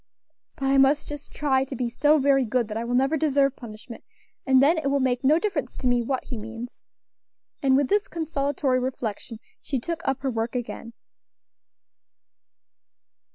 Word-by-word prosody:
But 270 - -4
I 270 0 +4
must 275 +2 +3
just 295 -1 -8
try 265 -3 +1
to 270 0 -7
be 245 0 -1
so 295 +6 +3
very 270 -1 +3
good 240 -1 -1
that 210 - -5
I 230 - -2
will 240 +1 -2
never 270 +5 +2
deserve 280 -2 +2
punishment, 225 0 -11 0.4
and 265 -1 +5
then 310 +5 +4
it 310 - -2
will 280 0 +1
make 255 -1 0
no 295 +4 +5
difference 410 +4 -3
to - - -6
me 245 -1 +3
what 260 +2 -2
he 245 - -6
means." 230 +3 -9 0.8
And 265 -2 +4
with 280 -1 +2
this 410 +5 +1
consolatory 285 -5 -1
reflection 235 -3 -4 0.2
she 275 - -3
took 330 +7 -4
up 270 0 -2
her 270 - 0
work 225 +1 -3
again. 235 -1 -5
265 Hz, 175 wpm, -25 LUFS, 245-285 Hz, 0.8 s, and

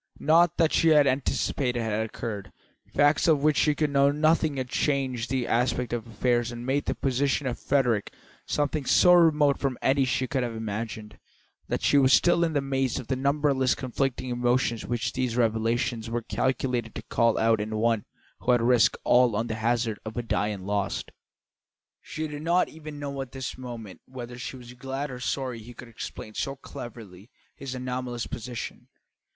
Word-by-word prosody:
Nought 165 +2 +4
that 165 -2 +3
she 165 - +3
had 150 -2 +6
anticipated 130 -1 0
had 110 -1 -1
occurred; 105 -3 -6 0.4
facts 145 +3 +3
of 150 -4 +3
which 155 -1 +4
she 150 +1 +3
could 150 -1 0
know 140 0 +4
nothing 155 0 +2
had 130 -1 -2
changed 130 -3 -1
the 130 -2 0
aspect 120 +1 0
of 120 -1 -3
affairs 120 +2 0
and 120 0 -7
made 135 +2 0
the - - -1
position 135 +2 0
of 125 -2 -2
Frederick 120 -7 +1 0.4
something 145 0 0
so 180 +7 +5
remote 155 -5 +4
from 135 -3 -1
any 135 +1 +2
she 130 0 0
could 130 +1 -1
have 120 -2 -3
imagined, 110 -1 -5 0.5
that - - -2
she 145 - +5
was 130 -1 +5
still 175 0 +4
in 165 -1 0
the 145 - +1
maze 135 -2 -1
of 130 - -7
the 130 - +1
numberless 140 -1 +1
conflicting 130 0 -2
emotions 120 -2 0
which 120 -2 -2
these 125 -2 -1
revelations 115 +1 0
were 115 0 -2
calculated 125 -3 -1
to - - -6
call 115 -1 +2
out 110 -1 +3
in 110 +1 -4
one 115 -1 +1 0.4
who 125 - +2
had 120 - +3
risked 120 -1 +4
all 125 -3 +4
on 110 +2 0
the 115 - -3
hazard 115 0 0
of 110 +1 -7
a 120 - -1
die 105 -2 0
and 100 -3 -5
lost. 100 -1 -2 0.9
She 155 0 -5
did 150 -1 -7
not 170 +3 +2
even 155 -1 -9
know 140 -1 -4
at 135 -2 -8
this 130 -2 -5
moment 120 -6 -8
whether 125 -1 -8
she 125 - -5
was 125 -1 -11
glad 135 +3 -5
or 125 - -7
sorry 125 -2 -2
he 120 +2 -12
could 125 - -11
explain 110 -1 -8
so 135 +5 -3
cleverly 110 -6 -10 0.3
his 135 -2 -6
anomalous 125 -1 -4
position. 120 -2 -6
125 Hz, 185 wpm, -27 LUFS, 115-140 Hz, 0.9 s, had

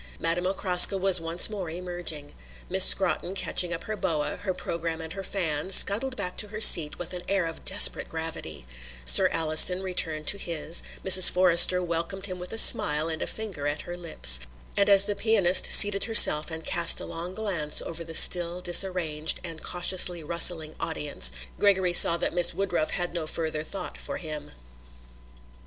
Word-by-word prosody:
Madame 175 +2 -4
Okraska 190 0 +3
was 190 -2 +2
once 165 +2 +1
more 200 -6 -9
emerging. 175 -3 -9 0.4
Miss - - +6
Scrotton, 65 - 0
catching 180 -2 -2
up 165 0 -8
her 215 - -8
boa, 150 -6 -6
her 200 -2 -7
programme 170 -2 -7
and 160 0 -10
her 195 - -9
fan, 170 -4 -6
scuttled 225 +7 +1
back 180 -7 -7
to 210 - -2
her 215 +1 -11
seat 165 -8 +4
with 175 0 -10
an 180 - -9
air 195 -3 -3
of 165 0 -10
desperate 195 +2 +2
gravity; 160 - -9 0.4
Sir - - +5
Alliston 165 +3 +1
returned 160 -4 -5
to 200 - -2
his; 165 -1 -4 0.2
Mrs. 185 -1 +6
Forrester 180 0 +3
welcomed 170 +3 -6
him 185 -2 -8
with 180 - -7
a 225 - -8
smile 150 -6 +4
and 160 0 -7
a - - -6
finger 195 -10 -9
at 145 +1 -6
her 175 - -11
lips; 155 - +2 0.4
and 200 0 -1
as 200 0 +4
the 205 - -5
pianist 200 -5 +2
seated 205 -1 +5
herself 165 -9 +5
and 160 0 -8
cast 170 -1 +1
a - - -7
long 175 +3 -10
glance 180 -9 -4
over 170 0 -9
the 165 0 -11
still 175 +1 +4
disarranged 175 -4 0
and 160 -1 -9
cautiously 180 -1 -1
rustling 160 -1 +1
audience, 150 - +1 0.3
Gregory 190 -3 -1
saw 170 -1 +6
that - - -6
Miss 175 0 +3
Woodruff 180 -5 -4
had 175 -2 -6
no 165 -3 -7
further 155 -1 -6
thought 190 +5 -9
for - - -9
him. 155 -3 -9
175 Hz, 180 wpm, -23 LUFS, 160-190 Hz, 0.4 s, Miss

